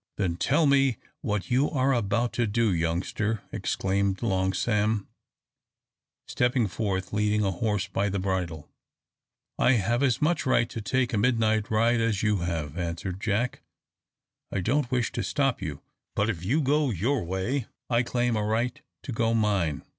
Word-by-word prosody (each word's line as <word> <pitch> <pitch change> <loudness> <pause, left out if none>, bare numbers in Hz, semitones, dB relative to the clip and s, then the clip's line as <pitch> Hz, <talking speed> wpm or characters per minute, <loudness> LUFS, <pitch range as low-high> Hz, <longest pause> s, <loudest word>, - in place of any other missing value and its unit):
"Then 90 -5 0
tell 145 - +2
me 135 -4 +3 0.2
what 105 -2 -2
you 135 +4 +3
are 135 -2 +2
about 120 +1 0
to 120 -2 +1
do, 110 -1 +2
youngster," 90 +6 -1
exclaimed 95 +1 -1
Long 95 -4 +1
Sam, 105 +1 0 1.2
stepping 125 -1 +1
forth, 95 -2 -3
leading 105 0 +2
a 95 - +1
horse 100 +1 -1
by 100 +1 0
the 100 - -2
bridle. 90 -5 -2 0.9
"I 130 - +5
have 120 +2 +1
as 130 -4 +2
much 155 +1 +1
right 120 -3 +2
to 115 - -5
take 125 +3 0
a 105 - +2
midnight 110 -2 +2
ride 115 +2 +3
as 110 -4 0
you 105 -1 +2
have," 85 -3 -3
answered 90 +2 -4
Jack. 110 +4 -1 0.9
"I - - -1
don't 125 +7 +1
wish 125 -2 0
to - - -3
stop 135 -4 0
you, 75 -2 -5 0.3
but 105 +3 +2
if 85 -5 -7
you 135 - +2
go 145 +1 +2
your 120 - 0
way, 95 +9 -2 0.2
I 120 -1 +2
claim 120 -1 0
a 105 - 0
right 115 +3 -1 0.2
to - - -5
go 115 0 +1
mine." 100 -9 +1
110 Hz, 165 wpm, -27 LUFS, 95-125 Hz, 1.2 s, I